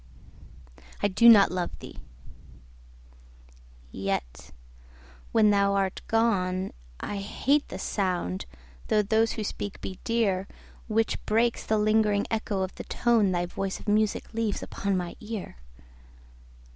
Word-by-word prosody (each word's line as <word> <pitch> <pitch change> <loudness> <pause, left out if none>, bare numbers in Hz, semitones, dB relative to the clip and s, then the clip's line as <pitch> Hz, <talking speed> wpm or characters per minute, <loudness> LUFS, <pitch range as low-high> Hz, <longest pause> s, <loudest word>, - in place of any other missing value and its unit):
I - - +5
do 235 +5 +6
not 205 -4 +8
love 180 -1 -3 2.2
thee!—yet, 95 -11 -3 0.8
when 215 -2 +5
thou 200 -1 +3
art 195 -1 -1
gone, 190 -5 +1 0.3
I 205 - -4
hate 270 +8 0
the - - -7
sound 180 - -2 0.4
(though 210 -1 +3
those 220 +2 +2
who 220 - -4
speak 205 -1 -5
be 185 - -7
dear) 200 -5 0 0.4
10 215 - -5
Which 225 0 0
breaks 230 +2 +2
the 215 - +1
lingering 210 -1 +2
echo 215 -3 -1
of 185 - -4
the - - -8
tone 230 -5 +2
Thy 175 -1 0
voice 190 +2 -4
of - - -14
music 210 +2 +1
leaves 225 -3 -1
upon 200 -1 -2
my 175 -1 -4
ear. 215 - -6
205 Hz, 130 wpm, -27 LUFS, 185-220 Hz, 2.2 s, not